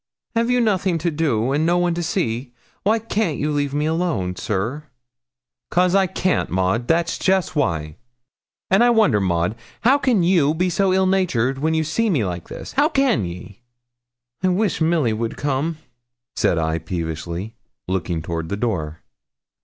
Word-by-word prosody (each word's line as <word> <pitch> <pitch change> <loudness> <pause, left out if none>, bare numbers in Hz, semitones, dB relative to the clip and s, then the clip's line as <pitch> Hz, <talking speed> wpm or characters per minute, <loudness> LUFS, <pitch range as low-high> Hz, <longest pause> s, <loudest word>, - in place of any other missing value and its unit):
Have 230 +1 +1
you 250 0 +3
nothing 195 -6 +1
to 170 +1 -1
do, 135 -6 0
and 145 +3 +1
no 170 +2 +2
one 175 -1 +1
to 170 - -2
see? 125 - -2 0.3
Why 215 +3 +2
can't 215 -7 -1
you 150 +1 -1
leave 145 -1 0
me 145 +1 -1
alone, 160 - -1
sir?' 110 +12 -3 0.8
''Cos 180 +1 +2
I 195 -1 +4
can't, 185 +1 0
Maud, 95 +6 0
that's 165 0 +1
jest 190 -3 +1
why; 80 - -1 0.7
and 195 +5 +5
I 240 - +5
wonder, 215 - +4
Maud, 85 0 0 0.3
how 265 +5 +4
can 245 -10 +2
you 165 -4 +3
be 180 +2 0
so 195 +2 +2
ill 190 0 +3
natured, 135 -10 +1
when 160 +2 +1
you 160 - +2
see 215 +9 0
me 140 - +1
like 90 -2 -5
this; - - -8
how 290 +3 +3
can 270 - +2
ye?' 90 +6 -9 0.8
'I 185 - +2
wish 185 0 0
Milly 160 -8 +2
would 115 +1 -3
come,' 145 +3 -1 0.6
said 85 - +2
I 80 0 0
peevishly, 85 +4 -4 0.3
looking 85 -3 -2
toward 80 -1 -4
the 100 - -2
door. 85 -9 -3
150 Hz, 170 wpm, -21 LUFS, -, 0.8 s, and